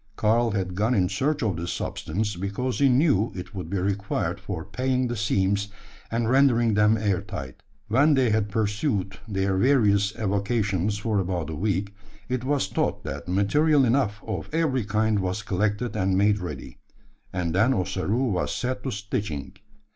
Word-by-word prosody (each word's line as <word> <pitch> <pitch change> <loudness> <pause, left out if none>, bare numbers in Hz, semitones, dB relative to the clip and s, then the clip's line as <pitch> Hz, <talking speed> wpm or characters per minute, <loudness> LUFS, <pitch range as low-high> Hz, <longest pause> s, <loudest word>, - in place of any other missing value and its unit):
Karl 115 +2 +2
had 95 -3 -2
gone 110 +7 +1
in 90 -4 +3
search 140 +8 0
of 100 -6 0
this 85 +2 -3
substance, 105 +5 -3
because 100 +8 -3
he 140 -1 +5
knew 125 - +3
it 90 - -7
would 95 -3 -6
be 100 - -1
required 100 +2 -1
for - - -5
paying 130 0 0
the 120 - -3
seams, 100 -1 +1 0.4
and 115 0 0
rendering 120 -3 +4
them 105 +1 +4
air 100 -4 0
tight. 65 -2 -7 0.3
When 140 +7 +4
they 130 -4 +3
had 105 -1 +1
pursued 105 -2 -1
their 95 -2 0
various 105 -4 +3
avocations 100 -2 0
for 105 0 0
about 90 -4 -2
a - - -4
week, 100 +2 -1 0.4
it 125 -1 -1
was 140 -3 +1
thought - - -1
that 70 +5 -6
material 135 - +3
enough 115 -4 +1
of 110 - -4
every 150 -8 +1
kind 105 0 +1
was 95 +2 -2
collected 105 +5 -1
and 95 0 +1
made 105 +1 +3
ready; 90 -2 -7 0.5
and 85 -3 -2
then 110 +8 +3
Ossaroo 105 +3 0
was 90 - -1
set 130 +1 -2
to 135 - -3
stitching. 100 - -4
105 Hz, 170 wpm, -25 LUFS, 95-120 Hz, 0.5 s, he